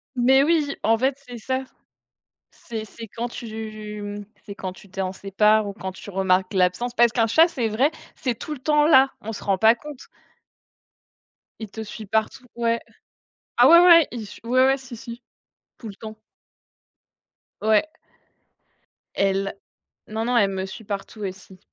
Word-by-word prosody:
Mais 265 Hz, +3 st, +4 dB
oui, 300 Hz, -3 st, +1 dB
en 225 Hz, +1 st, +3 dB
fait, 265 Hz, +3 st, 0 dB
c'est 245 Hz, -1 st, -8 dB
ça. 260 Hz, +3 st, -2 dB, 0.9 s
C'est 225 Hz, -2 st, -7 dB
c'est 225 Hz, +1 st, -11 dB
quand 235 Hz, +4 st, -4 dB
tu, 215 Hz, -2 st, -7 dB
mmh, 205 Hz, 0 st, -6 dB, 0.2 s
c'est 200 Hz, -, -7 dB
quand 185 Hz, -2 st, -5 dB
tu 195 Hz, +2 st, -16 dB
t'en 190 Hz, 0 st, -3 dB
sépares 210 Hz, +2 st, +2 dB
ou 200 Hz, -, -4 dB
quand 190 Hz, -1 st, -6 dB
tu 205 Hz, -, -11 dB
remarques 190 Hz, 0 st, +1 dB
l'absence 190 Hz, +7 st, +1 dB
parce 240 Hz, -1 st, +5 dB
qu'un 230 Hz, -1 st, +1 dB
chat 320 Hz, +10 st, +5 dB
c'est 265 Hz, -9 st, -2 dB
vrai, 255 Hz, +8 st, +2 dB, 0.2 s
c'est 250 Hz, -6 st, -3 dB
tout 305 Hz, -, -6 dB
le 285 Hz, -, -6 dB
temps 300 Hz, +1 st, +3 dB
là, 270 Hz, -3 st, +6 dB
on 225 Hz, +2 st, -5 dB
se -, -, -8 dB
rend 195 Hz, -2 st, 0 dB
pas 220 Hz, +3 st, +6 dB
compte 290 Hz, +2 st, -11 dB, 1.5 s
il 220 Hz, -, -7 dB
te 220 Hz, +2 st, -7 dB
suit 215 Hz, +1 st, -9 dB
partout, 220 Hz, +5 st, -1 dB
ouais. 235 Hz, 0 st, 0 dB, 0.8 s
Ah -, -, +7 dB
ouais, 340 Hz, +1 st, +9 dB
ouais, 340 Hz, -2 st, +7 dB
il 235 Hz, -3 st, -6 dB
j 200 Hz, -, -12 dB
ouais, 255 Hz, +2 st, +4 dB
ouais, 270 Hz, 0 st, +3 dB
si, 260 Hz, -3 st, -10 dB
si, 235 Hz, +1 st, -9 dB, 0.6 s
tout 230 Hz, -, -8 dB
le 200 Hz, -, -9 dB
temps. 215 Hz, -1 st, -10 dB, 1.4 s
Ouais. 215 Hz, 0 st, +4 dB, 1.3 s
Elle. 195 Hz, 0 st, 0 dB, 0.5 s
Non, 220 Hz, +1 st, -3 dB
non, 245 Hz, 0 st, +1 dB
elle 200 Hz, -3 st, +3 dB
me 190 Hz, 0 st, -3 dB
suit 205 Hz, +4 st, -9 dB
partout 205 Hz, +1 st, -6 dB
aussi. 190 Hz, -1 st, -7 dB
220 Hz, 170 wpm, -23 LUFS, 200-250 Hz, 1.5 s, ouais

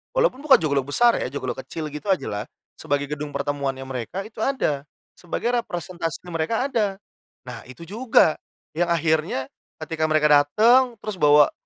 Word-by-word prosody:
walaupun -, -, +2 dB
bukan 280 Hz, -2 st, +6 dB
joglo 140 Hz, -3 st, +1 dB
besar 235 Hz, +10 st, +3 dB
ya -, -, -2 dB
joglo 130 Hz, -2 st, -4 dB
kecil 155 Hz, +3 st, -6 dB
gitu 150 Hz, +7 st, -8 dB
ajalah, 105 Hz, -, -1 dB, 0.3 s
sebagai 145 Hz, 0 st, -1 dB
gedung 150 Hz, 0 st, -4 dB
pertemuannya 140 Hz, -2 st, -2 dB
mereka 130 Hz, +9 st, -5 dB
itu 215 Hz, 0 st, -12 dB
ada. 150 Hz, -, -1 dB, 0.3 s
Sebagai 205 Hz, +7 st, -2 dB
representasi 175 Hz, -5 st, -5 dB
mereka 165 Hz, +11 st, -1 dB
ada. 205 Hz, -5 st, 0 dB, 0.5 s
Nah, 125 Hz, -2 st, -8 dB
itu 130 Hz, +6 st, -11 dB
juga 210 Hz, -3 st, +2 dB, 0.3 s
yang 175 Hz, +2 st, 0 dB
akhirnya 160 Hz, -5 st, 0 dB, 0.3 s
ketika 155 Hz, 0 st, -1 dB
mereka 155 Hz, -1 st, +3 dB, 0.2 s
datang 235 Hz, -, +4 dB
terus 210 Hz, -4 st, -5 dB
bawa 150 Hz, -1 st, +6 dB
160 Hz, 150 wpm, -23 LUFS, 145-215 Hz, 0.5 s, bukan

